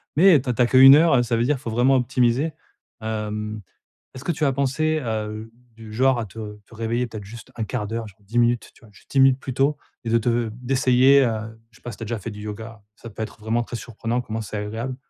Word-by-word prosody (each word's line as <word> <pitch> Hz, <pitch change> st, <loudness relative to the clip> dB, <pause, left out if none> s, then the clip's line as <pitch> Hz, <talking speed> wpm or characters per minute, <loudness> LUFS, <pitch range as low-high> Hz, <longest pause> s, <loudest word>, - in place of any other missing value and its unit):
Mais, 170 Hz, -2 st, +6 dB
tu 135 Hz, -, -14 dB
as -, -, +2 dB
tu 125 Hz, -, -1 dB
as -, -, +6 dB
qu'1 135 Hz, +2 st, +9 dB
heure, 150 Hz, -6 st, +4 dB
ça 115 Hz, -, 0 dB
veut 115 Hz, -, +1 dB
dire 145 Hz, +3 st, +2 dB
qu'il 130 Hz, -, -11 dB
faut 115 Hz, -, -4 dB
vraiment 125 Hz, +4 st, +3 dB
optimiser. 125 Hz, +4 st, +1 dB, 0.5 s
Hem, 105 Hz, -1 st, -4 dB, 0.5 s
est-ce 130 Hz, -, -9 dB
que 175 Hz, -, 0 dB
tu 150 Hz, -, -1 dB
as 135 Hz, -, +2 dB
pensé 155 Hz, +4 st, 0 dB
à, 110 Hz, -5 st, -2 dB
heu, 110 Hz, +1 st, -8 dB, 0.2 s
du 110 Hz, -1 st, -12 dB
genre 130 Hz, +1 st, +2 dB
à 110 Hz, -, -3 dB
te 105 Hz, 0 st, -9 dB
te 115 Hz, -, -16 dB
réveiller, 115 Hz, +2 st, -1 dB
peut-être, 110 Hz, -2 st, -8 dB
juste 115 Hz, +4 st, -12 dB
1/4 110 Hz, -1 st, -3 dB
d'heure, 115 Hz, 0 st, -4 dB
genre 105 Hz, +1 st, -17 dB
10 110 Hz, +4 st, -6 dB
minutes, 120 Hz, -1 st, +1 dB
tu -, -, -22 dB
vois, 110 Hz, -, -17 dB
juste -, -, -21 dB
10 135 Hz, -, +2 dB
minutes 135 Hz, 0 st, +5 dB
plus 130 Hz, -2 st, -6 dB
tôt 140 Hz, +2 st, +2 dB, 0.3 s
et -, -, -2 dB
de 115 Hz, -, +4 dB
te 115 Hz, 0 st, 0 dB
d'essayer, 130 Hz, +2 st, +4 dB
heu, 110 Hz, 0 st, -4 dB
je -, -, -20 dB
sais -, -, -26 dB
pas -, -, -6 dB
si -, -, -11 dB
tu -, -, -7 dB
as -, -, -4 dB
déjà 115 Hz, -2 st, -3 dB
fait 115 Hz, -, -6 dB
du 105 Hz, 0 st, -9 dB
yoga? 105 Hz, 0 st, -8 dB
Ça 115 Hz, -, -11 dB
peut 110 Hz, +1 st, -6 dB
être -, -, -9 dB
vraiment 115 Hz, +2 st, 0 dB
très 120 Hz, -, -7 dB
surprenant 120 Hz, +2 st, -3 dB
comment 110 Hz, -1 st, -5 dB
c'est 105 Hz, 0 st, -6 dB
agréable, 110 Hz, +5 st, -4 dB
115 Hz, 260 wpm, -23 LUFS, 110-130 Hz, 0.5 s, qu'1